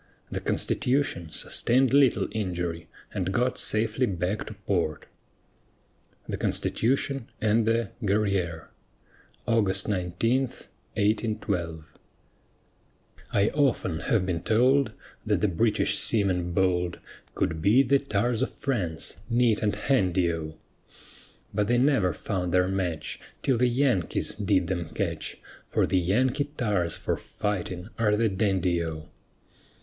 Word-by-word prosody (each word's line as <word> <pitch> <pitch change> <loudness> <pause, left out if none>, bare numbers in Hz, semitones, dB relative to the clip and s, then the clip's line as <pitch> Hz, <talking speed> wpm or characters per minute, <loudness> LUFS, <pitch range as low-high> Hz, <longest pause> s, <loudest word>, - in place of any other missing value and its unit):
The - - -2
Constitution 125 - 0
sustained 125 - +2
little 140 -3 +4
injury 90 -5 -3 0.2
and 95 -2 -2
got 125 +5 0
safely 110 +4 +2
back 90 +2 -2
to 110 - -8
port. 90 -6 -2 1.2
THE - - -3
CONSTITUTION 135 +1 0
AND 110 +1 +2
THE 115 -2 +1
GUERRIÈRE 100 -5 0 0.8
[August 100 -5 +1
19, 100 +6 0
1812] 100 - -3 1.5
I 100 +1 +3
often 130 - 0
have 105 -1 +1
been 85 -3 -2
told 125 +7 +3 0.3
That - - 0
the 105 - +3
British 105 +4 +2
seamen 95 -5 +2
bold 90 -1 +1 0.4
Could 80 0 -1
beat 120 +8 +4
the 140 0 +5
tars 120 -2 0
of 130 - -1
France 100 - -3
neat 115 -2 +2
and 105 -2 +1
handy 95 -7 +1
O; 80 -1 -6 1.0
But 105 0 0
they 120 +1 +3
never 125 -8 +3
found 90 +2 -3
their 90 0 +3
match, 90 -5 -3 0.2
Till 130 -4 +2
the 125 0 +3
Yankees 120 - +1
did 100 -3 +1
them 85 -2 -3
catch, - - -3 0.3
For - - +2
the 95 - +1
Yankee 130 - +1
tars 100 - 0
for - - -1
fighting 95 -2 -4
are 105 -2 +3
the 115 0 +2
dandy 95 -3 +1
O. 80 -1 -6
100 Hz, 125 wpm, -27 LUFS, 90-120 Hz, 1.5 s, the